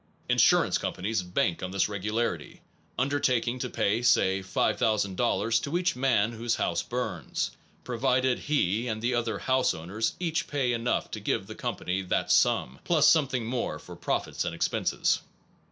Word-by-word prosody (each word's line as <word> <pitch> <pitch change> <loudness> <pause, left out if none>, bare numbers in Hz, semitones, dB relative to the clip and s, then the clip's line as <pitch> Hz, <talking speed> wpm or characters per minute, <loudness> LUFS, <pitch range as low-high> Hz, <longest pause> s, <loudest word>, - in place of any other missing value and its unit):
Insurance - - +4
companies 105 +3 -2
bank 90 -1 -1
on 90 - -3
this 95 0 +1
regularity, 105 +3 -3 0.4
undertaking 130 -2 +1
to 125 - -3
pay 110 0 0
(say) 95 -5 +3
5000 100 +1 0
dollars 115 +1 +1
to 145 +7 -2
each 180 -1 0
man 120 -4 +2
whose 115 0 -1
house - - 0
burns, - - -3 0.3
pro 120 -2 -5
vided 130 0 +2
he 120 -6 0
and 110 -2 -2
the 120 +3 0
other 115 -3 -1
house 130 +3 +1
owners 95 +8 -3
each 165 -3 -1
pay 135 -4 0
enough 115 +1 -1
to - - -4
give - - -1
the - - -8
company 90 +2 -3
that 95 - -1
sum, 65 +2 +2
plus 155 -3 +4
some 155 -4 +5
thing 125 -3 -2
more 120 +1 -2
for - - -11
profits - - -2
and - - -3
expenses. - - +1
115 Hz, 165 wpm, -28 LUFS, 100-130 Hz, 0.4 s, some